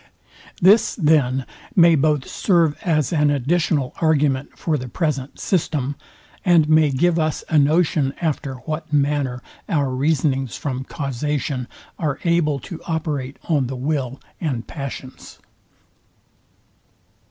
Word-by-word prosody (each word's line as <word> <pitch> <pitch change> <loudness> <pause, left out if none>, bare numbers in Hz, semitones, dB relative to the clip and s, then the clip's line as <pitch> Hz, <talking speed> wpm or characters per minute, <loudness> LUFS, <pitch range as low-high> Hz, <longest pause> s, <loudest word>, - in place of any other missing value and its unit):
This, 200 +5 +5
then, 140 - +2 0.3
may 170 -2 +7
both 150 -2 +2
serve 170 -6 +2
as 155 -4 +1
an 150 -2 +3
additional 145 0 0
argument 145 -4 +1
for 160 - -1
the 130 -3 -4
present 145 -1 -3
system, 150 -6 -1 0.5
and 170 -5 +4
may 155 -1 +5
give 165 +5 +2
us 155 -1 -1
a 155 - +4
notion 150 -2 +2
after 145 -5 -2
what 155 -1 -4
manner 140 -4 0 0.3
our 140 -5 +1
reasonings 135 - 0
from 130 -2 -4
causation 140 -2 -3 0.3
are 150 -4 -1
able 170 -4 +2
to 170 - -8
operate 150 -5 -3
on 145 -6 +1
the 130 - -5
will 135 -1 -2 0.2
and 130 -9 -2
passions. 135 -2 -8
150 Hz, 120 wpm, -21 LUFS, 135-160 Hz, 0.5 s, may